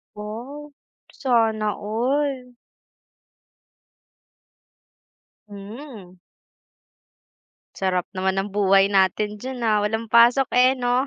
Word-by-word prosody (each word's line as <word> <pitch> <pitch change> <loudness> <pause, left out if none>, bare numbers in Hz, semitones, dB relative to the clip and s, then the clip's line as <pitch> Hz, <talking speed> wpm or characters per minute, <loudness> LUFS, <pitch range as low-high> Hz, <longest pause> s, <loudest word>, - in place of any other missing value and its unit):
Wow, 250 +8 -8 0.4
sana 225 -5 +1
all. 250 +4 -2 2.9
Hmm. 205 -1 -11 1.6
Sarap 185 -2 -1
naman 190 +1 0
ng 195 +2 -3
buhay 195 -1 +4
natin 200 +2 +1
diyan, 255 +4 -7
ah, 215 -1 +3
walang 220 +2 -2
pasok, 240 +4 +5
eh, 250 +1 +5
no? 245 +1 +1
220 Hz, 80 wpm, -22 LUFS, 200-250 Hz, 2.9 s, pasok